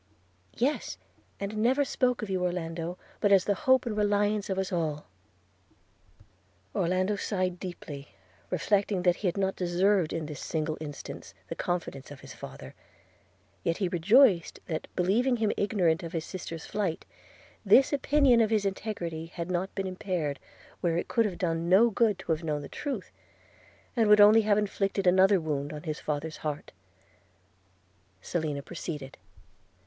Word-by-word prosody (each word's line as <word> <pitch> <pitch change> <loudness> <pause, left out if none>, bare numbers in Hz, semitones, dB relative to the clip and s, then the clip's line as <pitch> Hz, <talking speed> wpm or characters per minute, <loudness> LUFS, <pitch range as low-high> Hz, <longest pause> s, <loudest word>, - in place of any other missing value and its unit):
'Yes; 270 +6 -1 0.4
and 200 +2 -4
never 255 +6 +3
spoke 250 -3 0
of 215 - -5
you, 185 -1 0
Orlando, 170 -1 -3 0.2
but 205 - +2
as 195 -2 +5
the 205 - +2 0.2
hope 260 0 +5
and 225 -3 -2
reliance 205 0 +1
of 190 - -1
us 190 -1 -1
all.' 155 -4 -2 1.7
Orlando 185 +2 +1
sighed 185 -3 -1
deeply, 150 -6 -7 0.4
reflecting 195 +1 +1
that 180 -1 +3
he 205 - -2
had 180 - -1
not 195 -1 0
deserved 180 0 +2
in 165 -1 -3
this 150 -1 -7
single 155 -1 -2
instance 145 -2 -8
the - - -4
confidence 170 -6 -3
of 145 - -11
his - - -10
father; 65 0 -10 0.9
yet 165 - 0
he 195 - 0
rejoiced 185 +1 +4
that, 160 -2 -4
believing 235 +8 +2
him 220 -2 +1
ignorant 180 -6 +1
of 165 - -7
his 165 -2 -2
sister's 165 -3 -7
flight, 195 -6 -2 0.6
this 270 +2 +5
opinion 275 -3 +4
of 220 - +3
his 215 -2 +1
integrity 175 -5 -3
had 170 +1 -5
not 185 +2 -2
been 195 - -2
impaired 180 -6 -3 0.4
where 170 -2 0
it - - -3
could 230 -1 +2
have 190 -4 -3
done 165 -2 -1
no 220 +6 +6
good 215 -1 +2
to - - -4
have 160 +1 0
known 150 -2 -2
the - - -7
truth, 270 -10 -5 0.8
and 225 -3 +3
would 210 0 +7
only 210 +2 +8
have 210 -1 +2
inflicted 195 -1 -1
another 190 +2 +5
wound 145 -3 -3
on 150 -1 -7
his 155 -3 -4
father's 155 +1 -3
heart. 150 -1 -5 1.5
Selina 150 - -3
proceeded. 150 -4 -6
185 Hz, 160 wpm, -28 LUFS, 165-210 Hz, 1.7 s, only